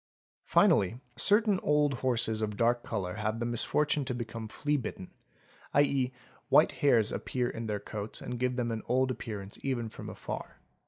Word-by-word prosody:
Finally 100 Hz, +5 st, +3 dB, 0.2 s
certain 205 Hz, -1 st, +4 dB
old 150 Hz, -1 st, +2 dB
horses 115 Hz, -4 st, 0 dB
of 105 Hz, -1 st, -2 dB
dark 120 Hz, +1 st, +2 dB
colour 100 Hz, -3 st, -3 dB
have 110 Hz, +1 st, -2 dB
the 120 Hz, -, -1 dB
misfortune 145 Hz, +5 st, +2 dB
to 130 Hz, -2 st, -3 dB
become 115 Hz, -2 st, -5 dB
fleabitten, 130 Hz, -7 st, -3 dB, 0.6 s
¢.c., 140 Hz, -3 st, +3 dB, 0.4 s
white -, -, +6 dB
hairs 120 Hz, -7 st, +3 dB
appear 125 Hz, -1 st, -2 dB
in 115 Hz, -1 st, -5 dB
their 105 Hz, -1 st, -2 dB
coats 105 Hz, +1 st, -5 dB
and 125 Hz, -, -5 dB
give 125 Hz, 0 st, 0 dB
them 120 Hz, -2 st, -1 dB
an 110 Hz, -1 st, -3 dB
old 130 Hz, +2 st, +2 dB
appearance 105 Hz, -5 st, -6 dB
even 120 Hz, -4 st, -2 dB
from -, -, -8 dB
afar. -, -, -7 dB
120 Hz, 160 wpm, -30 LUFS, 110-130 Hz, 0.6 s, white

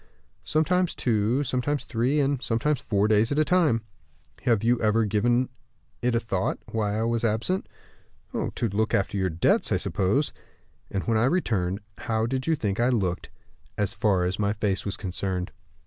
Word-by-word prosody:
"Sometimes 180 Hz, +3 st, +1 dB
two, 115 Hz, +3 st, +1 dB
sometimes 135 Hz, +2 st, -1 dB
three, 130 Hz, +5 st, 0 dB
and 140 Hz, -2 st, +1 dB
sometimes 130 Hz, +4 st, 0 dB
four 100 Hz, -1 st, +1 dB
days 110 Hz, +2 st, +3 dB
at 140 Hz, -, 0 dB
a 155 Hz, -, +4 dB
time." 155 Hz, -11 st, +3 dB, 0.6 s
"Have 115 Hz, -4 st, +3 dB
you 120 Hz, +1 st, +2 dB
ever 110 Hz, +1 st, +3 dB
given 120 Hz, +5 st, +2 dB, 0.5 s
it 120 Hz, 0 st, +1 dB
a -, -, +3 dB
thought, 95 Hz, -5 st, -1 dB
why 105 Hz, -2 st, 0 dB
I 110 Hz, -, 0 dB
was 115 Hz, 0 st, 0 dB
absent?" 115 Hz, -, 0 dB, 0.6 s
"To 120 Hz, -, -1 dB
look 110 Hz, +3 st, +1 dB
after 100 Hz, +1 st, 0 dB
your 95 Hz, -2 st, +1 dB
debts, 85 Hz, +1 st, +2 dB
I -, -, +3 dB
suppose." 105 Hz, +9 st, 0 dB, 0.6 s
"And 100 Hz, -, -2 dB
when 115 Hz, -1 st, +1 dB
I 115 Hz, -, +3 dB
returned, 105 Hz, -, 0 dB, 0.2 s
how 110 Hz, -1 st, 0 dB
did 130 Hz, +3 st, -2 dB
you 165 Hz, -, +3 dB
think 105 Hz, -7 st, -2 dB
I 120 Hz, +2 st, +3 dB
looked, 95 Hz, -8 st, -1 dB, 0.5 s
as 105 Hz, -2 st, 0 dB
far 100 Hz, -4 st, +2 dB
as 90 Hz, +3 st, -2 dB
my 100 Hz, 0 st, +1 dB
face 105 Hz, -2 st, -1 dB
was 100 Hz, +1 st, -2 dB
concerned?" 95 Hz, 0 st, -3 dB
115 Hz, 175 wpm, -26 LUFS, 100-130 Hz, 0.6 s, a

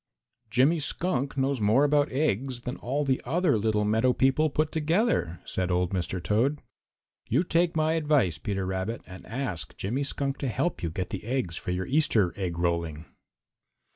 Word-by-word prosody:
"Jimmy 135 Hz, +9 st, +3 dB
Skunk 140 Hz, -3 st, -1 dB
knows 135 Hz, -2 st, 0 dB
more 110 Hz, +7 st, +4 dB
about 145 Hz, 0 st, +3 dB
eggs 130 Hz, -2 st, 0 dB
than 125 Hz, +2 st, -4 dB
all 140 Hz, +4 st, -2 dB
the 130 Hz, -1 st, +1 dB
other 165 Hz, +2 st, +2 dB
little 105 Hz, 0 st, +1 dB
meadow 110 Hz, +4 st, +3 dB
people 135 Hz, +5 st, +3 dB
put 155 Hz, +2 st, 0 dB
together," 160 Hz, -, +1 dB
said 95 Hz, -1 st, -2 dB
old 90 Hz, 0 st, +1 dB
Mr. 95 Hz, -1 st, -2 dB
Toad. 115 Hz, -, +1 dB, 0.7 s
"You 135 Hz, +9 st, +3 dB
take 170 Hz, -1 st, +1 dB
my 155 Hz, 0 st, +2 dB
advice, 145 Hz, -, +2 dB
Peter 95 Hz, +3 st, -2 dB
Rabbit, 95 Hz, +5 st, -3 dB
and 95 Hz, 0 st, -11 dB
ask 110 Hz, -, -4 dB
Jimmy 120 Hz, +8 st, -2 dB
Skunk 140 Hz, 0 st, -2 dB
to 140 Hz, -, -2 dB
help 165 Hz, +8 st, -1 dB
you 85 Hz, -, -1 dB
get 90 Hz, +3 st, -4 dB
the -, -, -5 dB
eggs 115 Hz, -7 st, -2 dB
for -, -, -6 dB
your 90 Hz, +1 st, -1 dB
Easter 125 Hz, -, +2 dB
egg 90 Hz, -4 st, -3 dB
rolling." 85 Hz, -2 st, -1 dB
125 Hz, 170 wpm, -27 LUFS, 95-145 Hz, 0.7 s, more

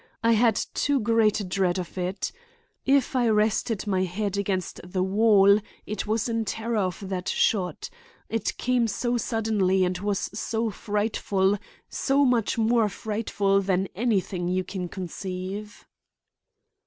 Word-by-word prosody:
I 230 Hz, -, +4 dB
had 230 Hz, 0 st, +4 dB, 0.2 s
too 285 Hz, -1 st, +1 dB
great 220 Hz, -1 st, +2 dB
a -, -, -3 dB
dread 185 Hz, -1 st, 0 dB
of 180 Hz, -2 st, -5 dB
it. 185 Hz, +1 st, -2 dB, 0.6 s
If 270 Hz, -1 st, +3 dB
I 245 Hz, -2 st, +3 dB
rested 215 Hz, 0 st, +1 dB
my 190 Hz, -3 st, +1 dB
head 200 Hz, +2 st, -2 dB
against 195 Hz, -2 st, -2 dB
the 185 Hz, +1 st, -2 dB
wall 200 Hz, 0 st, +5 dB, 0.3 s
it 210 Hz, 0 st, -4 dB
was 220 Hz, +2 st, 0 dB
in 230 Hz, -1 st, 0 dB
terror 225 Hz, +2 st, -2 dB
of 190 Hz, +1 st, -2 dB
that 185 Hz, -1 st, -3 dB
shot. 185 Hz, -5 st, 0 dB, 0.4 s
It 225 Hz, 0 st, -2 dB
came 250 Hz, -2 st, +1 dB
so 240 Hz, +3 st, -1 dB
suddenly 210 Hz, -5 st, +1 dB
and 180 Hz, 0 st, -2 dB
was 200 Hz, 0 st, -2 dB
so 225 Hz, +1 st, -2 dB
frightful, 205 Hz, -1 st, 0 dB, 0.3 s
so 280 Hz, +1 st, +2 dB
much 240 Hz, -4 st, +1 dB
more 225 Hz, -1 st, +3 dB
frightful 205 Hz, -2 st, 0 dB
than 190 Hz, 0 st, 0 dB
anything 195 Hz, -4 st, 0 dB
you 185 Hz, +1 st, 0 dB
can 185 Hz, -1 st, -5 dB
conceive." 190 Hz, +3 st, -6 dB
205 Hz, 140 wpm, -26 LUFS, 190-225 Hz, 0.6 s, wall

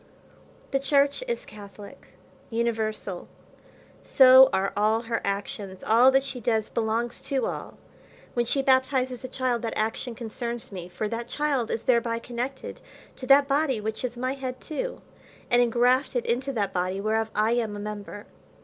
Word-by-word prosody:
The 270 Hz, -, +1 dB
church 280 Hz, -, +2 dB
is 475 Hz, -1 st, -3 dB
Catholic, 205 Hz, +4 st, -12 dB, 0.4 s
universal, 220 Hz, -5 st, -2 dB, 0.7 s
so 260 Hz, 0 st, +7 dB
are 190 Hz, +1 st, 0 dB
all 215 Hz, +2 st, +2 dB
her 230 Hz, 0 st, -3 dB
actions; 200 Hz, -1 st, -4 dB
all 235 Hz, +4 st, +6 dB
that 270 Hz, 0 st, +3 dB
she 270 Hz, -2 st, -6 dB
does 220 Hz, -2 st, 0 dB
belongs 230 Hz, +1 st, -1 dB
to 270 Hz, -2 st, -1 dB
all. -, -, -6 dB, 0.6 s
When 240 Hz, -1 st, 0 dB
she 275 Hz, +3 st, 0 dB
baptizes 260 Hz, -1 st, +1 dB
a -, -, -4 dB
child, 255 Hz, -2 st, -1 dB
that 230 Hz, -, -3 dB
action 225 Hz, +2 st, -2 dB
concerns 235 Hz, +1 st, -5 dB
me; 180 Hz, -2 st, -7 dB
for 195 Hz, +4 st, -3 dB
that 230 Hz, +2 st, -4 dB
child 280 Hz, -4 st, -1 dB
is 225 Hz, -, -2 dB
thereby 235 Hz, -2 st, +2 dB
connected 245 Hz, +3 st, -6 dB, 0.4 s
to 255 Hz, -, -8 dB
that 275 Hz, +1 st, +6 dB
body 275 Hz, -3 st, +1 dB
which 220 Hz, +2 st, -4 dB
is 245 Hz, -1 st, -3 dB
my 255 Hz, +2 st, -1 dB
head 260 Hz, -2 st, -5 dB
too, -, -, -5 dB, 0.5 s
and 240 Hz, 0 st, +5 dB
ingrafted[Pg 245 Hz, +3 st, +2 dB
108] 245 Hz, -, 0 dB
into 255 Hz, +4 st, -1 dB
that 210 Hz, -6 st, -2 dB
body 185 Hz, +1 st, -1 dB
whereof 220 Hz, +2 st, 0 dB
I 215 Hz, +2 st, +2 dB
am 230 Hz, -3 st, 0 dB
a -, -, -6 dB
member. 205 Hz, 0 st, -7 dB
235 Hz, 165 wpm, -26 LUFS, 215-260 Hz, 0.7 s, so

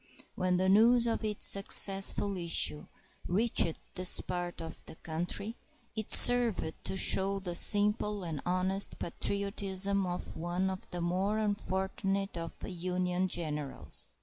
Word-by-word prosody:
When 185 Hz, -1 st, -2 dB
the 185 Hz, +1 st, -1 dB
news 230 Hz, +5 st, +3 dB
of 230 Hz, -1 st, -3 dB
its 210 Hz, -1 st, -3 dB
successful 195 Hz, 0 st, +3 dB
issue 170 Hz, -4 st, +1 dB, 0.4 s
reached 185 Hz, -4 st, 0 dB, 0.2 s
this 185 Hz, 0 st, +2 dB
part 175 Hz, -1 st, -6 dB
of 165 Hz, 0 st, -9 dB
the -, -, -11 dB
country, 175 Hz, +8 st, -5 dB, 0.4 s
it 220 Hz, -2 st, -6 dB
served 235 Hz, -9 st, +6 dB
to 190 Hz, -, -3 dB
show 195 Hz, +1 st, +3 dB
the 180 Hz, -2 st, -7 dB
simple 210 Hz, +2 st, +3 dB
and 160 Hz, -5 st, -6 dB
honest 185 Hz, +2 st, +1 dB
patriotism 200 Hz, +1 st, -2 dB
of 180 Hz, 0 st, -7 dB
one 175 Hz, +3 st, -3 dB
of 190 Hz, -, -9 dB
the 175 Hz, -, -7 dB
more 185 Hz, +5 st, -2 dB
unfortunate 195 Hz, -1 st, -4 dB
of 165 Hz, -1 st, -8 dB
the -, -, -8 dB
Union 180 Hz, +1 st, -3 dB
generals. 150 Hz, -, -4 dB
190 Hz, 135 wpm, -29 LUFS, 175-200 Hz, 0.4 s, served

